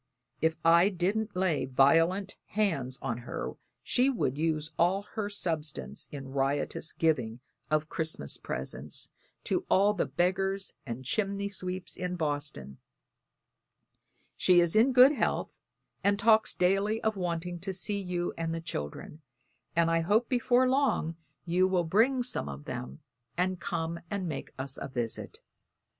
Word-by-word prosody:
If 160 0 +2
I 170 +3 +6
didn't 205 +3 -1
lay 180 -6 +1
violent 165 +9 +3
hands 160 -12 0
on 120 -3 -2
her 120 - -5 0.3
she 255 +2 +3
would 220 - 0
use 155 0 -1
all 190 +4 +2
our 210 -2 -1
substance 160 -7 -3
in 135 -2 -7
riotous 140 +3 -1
giving 125 -8 0 0.3
of 155 0 +1
Christmas 160 - -2
presents 65 +3 -3 0.3
to - - 0
all 200 +2 +5
the 200 - -1
beggars 190 +6 0
and 120 +2 -5
chimney 200 - -1
sweeps 185 -1 -4
in 180 0 -3
Boston. 145 - -3 1.6
She 180 -1 +5
is 170 +1 +3
in 230 +5 +5
good 255 +2 +8
health 295 - -1 0.5
and 200 0 +3
talks 220 +1 +4
daily 195 +4 +2
of 220 -1 +1
wanting 175 -1 -3
to 195 +3 -4
see 200 +2 -1
you 180 -2 -2
and 165 0 -2
the - - -3
children; 150 - -6 0.5
and 165 0 +3
I 165 - +3
hope 210 +8 +2
before 250 0 +3
long 255 - +1 0.3
you 180 +2 +3
will 185 -2 +2
bring 230 +10 +3
some 240 - -1
of 70 +1 -8
them, 65 +2 -6 0.4
and 185 0 0
come 170 -2 -3
and 200 -3 -2
make 155 -4 -5
us 135 0 -4
a - - -3
visit. 120 -4 -4
175 Hz, 145 wpm, -30 LUFS, 150-200 Hz, 1.6 s, good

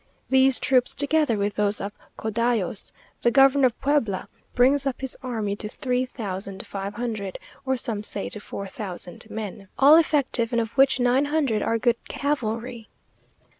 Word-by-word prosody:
These 265 0 +5
troops, 255 -2 +2
together 290 -4 +2
with 200 0 -2
those 205 0 +1
of 200 - -4 0.3
Codallos 220 -3 -1 0.3
(the 235 - +4
Governor 270 +1 +5
of 240 - -6
Puebla) 250 -10 0 0.3
brings 275 +3 +4
up 265 - -2
his 265 -1 -2
army 220 -6 -2
to 210 - -5
three 250 +2 -1
thousand 195 -5 -4
five 200 +1 -5
hundred, 220 -5 -4 0.3
or 265 0 +1
some 225 -3 -2
say 205 -1 -3
to 210 - -7
four 200 -1 -7
thousand 190 +1 -7
men, 210 -2 -6
all 290 +4 +8
effective, 280 -7 +1
and 235 - +1
of 225 -1 -2
which 270 0 +4
nine 250 +3 +3
hundred 285 -8 0
are 230 - +1
good 235 0 +1
cavalry. 240 -4 -3
235 Hz, 165 wpm, -24 LUFS, 210-265 Hz, 0.3 s, all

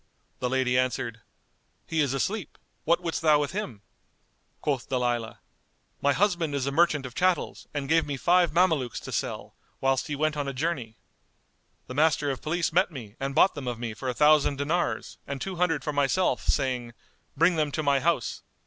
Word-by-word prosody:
The 125 - -1
lady 125 -1 +2
answered, 115 -3 -2 0.6
"He 160 -1 0
is 140 -2 +1
asleep; 200 - -2 0.3
what 170 +2 +3
wouldst 165 -2 -2
thou 155 -2 +5
with 145 -1 -1
him?" 130 - -5 0.8
Quoth 140 -4 -2
Dalilah, 120 -3 -1 0.6
"My 140 - +3
husband 175 -4 +1
is 135 -2 -1
a 140 - -1
merchant 150 -2 +2
of 125 - -7
chattels 185 +3 0
and 145 -2 -3
gave 160 +1 +3
me 140 -2 -3
five 175 +3 +3
Mamelukes 160 -7 +2
to - - -8
sell, - - -3 0.3
whilst 135 -1 +1
he 150 - -2
went 155 +1 0
on 145 -1 -2
a 140 - -3
journey. 130 -6 -3 0.9
The - - -8
Master 150 0 +2
of 135 - -5
Police 165 +1 -1
met 185 +3 +3
me 120 -9 -9
and 135 0 -3
bought 195 - +5
them 140 -4 -6
of 120 -2 -2
me 115 -1 -4
for 130 +4 -4
a 125 - -3
thousand 150 0 +4
dinars 155 +5 -1
and 140 -1 -4
two 190 +4 -5
hundred 165 -4 +1
for 150 - -2
myself, 145 +6 +1
saying, 125 -4 0 0.4
'Bring 170 +3 +4
them 155 -2 0
to 155 - -2
my 140 -1 +3
house. 160 -4 0
145 Hz, 190 wpm, -27 LUFS, 130-165 Hz, 0.9 s, thou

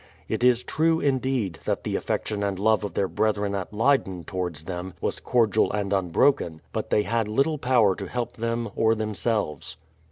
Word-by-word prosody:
It - - -2
is 125 -1 +4
true, 160 +1 +1
indeed, 130 - 0
that - - -1
the - - -2
affection 105 -2 -2
and 100 -2 -1
love 110 +2 +2
of 105 - -5
their 100 - +1
brethren 105 0 0
at 95 -2 -3
Leyden 105 -6 +1
towards 90 -3 -4
them 90 +1 -6
was - - -2
cordial 110 -3 +2
and 100 -1 -1
unbroken; 95 - +2
but - - -3
they 105 - +3
had 115 -1 0
little 140 +8 +1
power 120 -7 +4
to - - -5
help 120 -2 -3
them 115 +1 -2
or 110 0 +3
themselves. 105 -8 -2
110 Hz, 180 wpm, -25 LUFS, 95-120 Hz, -, is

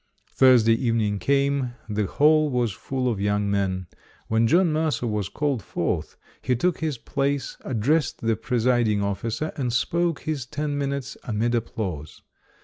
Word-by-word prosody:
Thursday 125 -4 +5
evening 115 -4 0
came; 140 -2 +1
the 105 -2 -1
hall 155 +4 +4
was 120 -4 0
full 130 +4 -3
of 110 -5 -1
young 100 0 +1
men. 95 -2 0 0.4
When 110 +1 +3
John 170 +5 +4
Mercer 155 -6 0
was 105 -4 -2
called 145 -6 -1
forth, - - -3 0.2
he 125 - +1
took 175 +9 0
his 155 -4 -2
place, 140 +3 -2
addressed 130 +4 0
the 115 -1 +1
presiding 120 -3 +1
officer 115 - -2
and 125 -4 -1
spoke 170 +6 0
his 145 -6 -3
ten 145 0 -3
minutes 140 -1 -3
amid 115 +1 -1
applause. 95 -10 -4
120 Hz, 145 wpm, -24 LUFS, 110-140 Hz, 0.4 s, Thursday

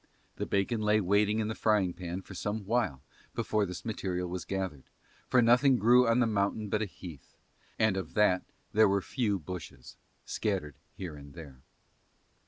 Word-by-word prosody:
The - - -3
bacon 100 +3 0
lay 105 0 +3
waiting 105 +2 +2
in 110 -1 0
the 110 - -2
frying 105 -5 +2
pan 90 +1 -5
for 95 - -11
some 105 +2 -3
while 105 - 0 0.3
before 105 -2 0
this 90 0 -7
material 90 -5 -2
was 90 0 -5
gathered, 95 -8 -4 0.4
for 125 -2 +4
nothing 125 +3 +5
grew 120 +3 +5
on 115 +1 +3
the 125 - +4
mountain 105 0 0
but 105 +2 0
a - - +1
heath; 85 -5 -12 0.4
and 110 -3 +3
of 95 -4 -5
that 100 -4 +4 0.3
there 110 -1 +6
were 100 -1 +1
few 110 -7 0
bushes, 85 -7 -9 0.3
scattered 90 - -2 0.2
here 90 -5 -6
and 70 0 -12
there. 70 -6 -11
100 Hz, 175 wpm, -30 LUFS, 90-110 Hz, 0.4 s, there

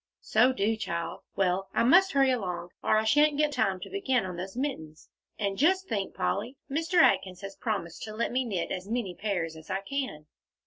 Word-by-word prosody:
"So 245 +4 +4
do, 225 -2 +1
child. 170 -6 -4
Well, 190 0 +1
I - - +3
must 370 +10 +5
hurry 270 -1 +4
along, 180 -7 -3
or - - +3
I 215 - +2
shan't 295 +6 +4
get 300 0 +2
time 215 -9 0
to - - -7
begin 265 - +1
on 180 -1 -5
those 190 +5 -6
mittens. 160 - -5 0.3
And 200 -1 -2
just 375 +6 +3
think, 200 -3 -2
Polly, 230 - -2
Mr. 325 +5 -2
Atkins 185 - +4
has 195 0 -7
promised 185 -7 -3
to 215 -1 -8
let 230 - -1
me 255 +2 +1
knit 195 -8 -3
as 185 +2 -4
many 225 -6 -2
pairs 175 -5 -2
as 160 0 -13
I 190 +1 -1
can." 255 - -4
215 Hz, 205 wpm, -28 LUFS, 185-265 Hz, 0.3 s, must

